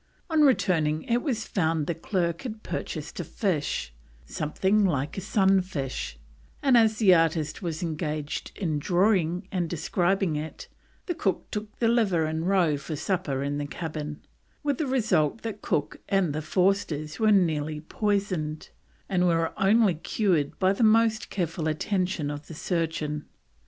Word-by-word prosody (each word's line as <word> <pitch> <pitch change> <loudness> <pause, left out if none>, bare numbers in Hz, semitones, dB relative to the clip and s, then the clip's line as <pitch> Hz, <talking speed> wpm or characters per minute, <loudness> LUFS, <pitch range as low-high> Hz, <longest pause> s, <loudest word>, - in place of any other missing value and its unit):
On 315 -1 +4
returning 160 - +3
it 240 +1 +1
was 240 -8 -2
found 160 -4 0
the 170 - -1
clerk 170 0 -1
had 220 -4 -7
purchased - - -5
a - - -1
fish, 155 - -2 0.3
something 190 - +1
like 145 -6 0
a 195 - -3
sun 195 -1 +3
fish; 140 -8 -4 0.5
and 270 -3 +5
as 220 -2 +5
the 200 -5 +6
artist 160 -2 +1
was 170 -2 -3
engaged 155 -2 -3
in 160 -7 -1
drawing 180 +1 +2
and 175 -4 -1
describing 175 +1 0
it, 155 +1 -6 0.4
the 350 - -1
cook 195 - -2
took 210 0 -5
the 230 - +2
liver 205 -9 +3
and 160 +2 -2
roe 180 -6 +3
for 155 +2 -5
supper 155 -4 -1
in 145 +1 -2
the 145 - -3
cabin, 155 -2 -5 0.4
with 285 -3 0
the 310 - 0
result 220 - +1
that 215 -2 -5
Cook 145 - -2
and 190 -6 +2
the 155 - -2
Forsters 165 -3 0
were 215 -1 +4
nearly 155 -6 +2
poisoned, 185 -3 -2 0.4
and 180 -2 +2
were 165 -1 +1
only 205 0 +4
cured 165 -2 0
by 190 0 +3
the 215 - 0
most 220 0 +3
careful 165 -3 -2
attention 180 -1 -1
of 145 0 -7
the 160 - -9
surgeon. 160 -3 -2
175 Hz, 155 wpm, -27 LUFS, 155-205 Hz, 0.5 s, the